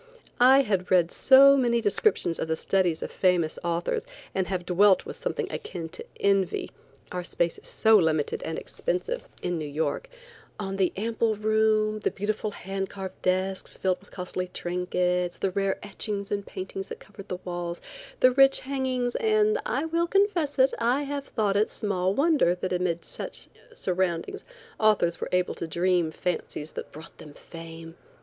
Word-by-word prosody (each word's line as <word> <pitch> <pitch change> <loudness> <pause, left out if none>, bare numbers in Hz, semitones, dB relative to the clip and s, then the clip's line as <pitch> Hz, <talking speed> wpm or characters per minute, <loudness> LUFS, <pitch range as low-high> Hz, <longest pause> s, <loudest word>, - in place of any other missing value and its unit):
I 260 +3 +7
had 195 -7 -1
read 175 -2 +4
so 275 +1 +7
many 240 -3 +2
descriptions 205 - +1
of - - -2
the 160 - 0
studies 180 -1 0
of - - -6
famous 175 -4 +1
authors, 170 - -1 0.3
and 190 -1 0
have 180 -2 -3
dwelt 190 +2 +4
with - - -7
something - - -2
akin 165 -3 -6
to 175 - -8 0.2
envy 195 -2 +1 0.4
(our 180 0 -3
space 170 -1 -1
is - - -16
so 220 -1 +5
limited 160 -5 +1
and 160 - -4
expensive 335 - -3 0.2
in 175 -2 -1
New 155 - -4
York) 160 - -2 0.5
on 195 -1 -3
the 190 -2 +2
ample 225 +1 0
room, 215 0 +2
the - - 0
beautiful 215 +2 -2
hand 195 -1 -5
carved 190 -1 -8
desks 185 +1 -1
filled 185 -1 0
with 200 - -20
costly 180 0 -4
trinkets, 180 0 -1
the 195 - -1
rare 195 +1 0
etchings 205 0 -4
and 200 -1 -2
paintings 190 +1 -6
that - - -7
covered 200 -1 -13
the 180 - -4
walls, 175 -1 -4 0.4
the 255 - +7
rich 270 +1 +5
hangings, 260 -2 -1
and, 430 0 +2
I - - -1
will 335 +1 0
confess 360 -7 +1
it, 265 0 +4
I 245 +5 +2
have 285 0 -4
thought 205 -3 0
it 210 +2 +2
small 190 -2 -1
wonder 280 - +3
that 185 +1 -3
amid 180 -2 -1
such - - -3 0.2
surroundings 185 - -2 0.4
authors 210 -6 +3
were - - -3
able 180 0 +1
to 170 - -5
dream 175 0 +1
fancies 155 -2 -4
that - - -7
brought 155 +2 -12
them 145 -1 -12
fame. 165 -1 -10
195 Hz, 170 wpm, -27 LUFS, 180-230 Hz, 0.5 s, I